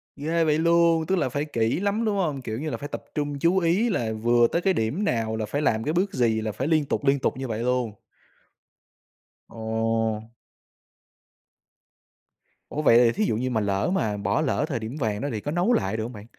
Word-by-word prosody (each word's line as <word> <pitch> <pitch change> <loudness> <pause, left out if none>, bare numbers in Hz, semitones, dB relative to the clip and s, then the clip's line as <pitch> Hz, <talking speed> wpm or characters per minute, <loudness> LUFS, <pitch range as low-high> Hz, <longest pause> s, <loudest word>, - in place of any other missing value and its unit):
Ghê 165 +3 0
vậy 155 -1 +2
luôn, 170 -1 +3
tức 190 - +1
là 135 - 0
phải 145 +3 -2
kỹ 115 0 0
lắm, 205 +3 0
đúng 210 -2 +1
hông? 150 -8 -1
Kiểu 110 0 -4
như 155 +1 -3
là, - - -3
phải 145 - -6
tập - - -5
trung 145 -1 -2
chú 170 +5 +2
ý 190 +7 +2
là 115 - -1
vừa 120 +2 +3
tới 170 - -1
cái 190 0 +2
điểm 135 - -1
nào 115 - 0
là 110 -1 -2
phải 140 +8 -2
làm 110 -5 +1
cái 155 - -1
bước 190 +3 0
gì 110 -3 +1
là 110 -1 -2
phải 130 +7 -3
liên 155 -3 +2
tục, 140 - -2
liên 140 0 +3
tục - - -1
như 135 -1 -4
vậy 110 -1 -3
luôn. 125 -3 0 1.5
Ồ! 110 -1 -1 2.5
Ủa, 150 - -3
vậy 115 -6 +6
thì 120 -1 +5
thí 215 - -1
dụ - - 0
như 125 +3 -1
mà 110 -3 0
lỡ 100 - 0
mà 105 - 0
bỏ 100 - 0
lỡ 150 0 0
thời 130 -7 -2
điểm 110 +6 -6
vàng 105 -4 -1
đó 145 - -2
thì 110 - -4
có 145 - -4
nấu 180 +8 +2
lại 100 +1 0
được 110 - -2
hông 120 +3 -6
bạn? 105 -1 -10
130 Hz, 225 wpm, -25 LUFS, 110-165 Hz, 2.5 s, vậy